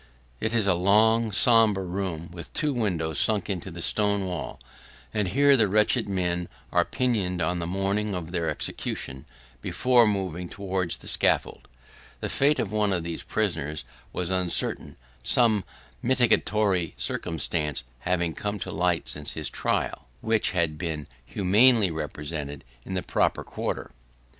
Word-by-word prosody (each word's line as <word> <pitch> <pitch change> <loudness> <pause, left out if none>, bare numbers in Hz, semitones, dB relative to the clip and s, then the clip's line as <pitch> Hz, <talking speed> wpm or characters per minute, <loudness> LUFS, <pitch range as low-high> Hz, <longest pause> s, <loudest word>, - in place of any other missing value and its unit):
It 110 +1 -1
is 110 -3 +3
a 100 - +4
long, 110 +5 +3
sombre 110 -2 +5
room, 90 -3 -4
with 85 -1 -9
two 150 -2 +1
windows 85 - -1
sunk 105 -2 +2
into 95 0 -4
the 85 -1 -6
stone 100 -2 +1
wall, 80 -11 -5 0.5
and 105 -2 0
here 140 +9 +4
the 110 -5 +3
wretched 105 +1 +2
men 90 -2 -1 0.2
are - - +3
pinioned 105 -8 -1
on 90 +2 0
the 85 - -3
morning 100 +2 -1
of 85 -2 -5
their 85 -3 -1
execution, 65 0 -4 0.3
before 125 - +3
moving 90 -4 -2
towards 95 -3 -2
the - - -11
scaffold. - - +1 0.5
The - - -3
fate 145 +2 +2
of 100 - -2
one 105 -1 +1
of 90 -3 -1
these 85 -1 -4
prisoners 75 +2 -2 0.3
was 90 0 -2
uncertain; 90 -2 +1 0.3
some 110 - +3 0.4
mitigatory 110 -8 +2
circumstances 75 -3 -1 0.2
having 85 0 0
come 105 +4 -3
to - - -4
light 90 -2 0
since 75 -1 -2
his - - -2
trial, - - -2
which 110 -1 +2
had 80 -4 -1
been 80 -4 -3 0.2
humanely 105 - +4
represented 75 -2 -5 0.2
in 95 - -4
the 90 - -2
proper - - 0
quarter. - - -4
95 Hz, 150 wpm, -26 LUFS, 85-105 Hz, 0.5 s, sombre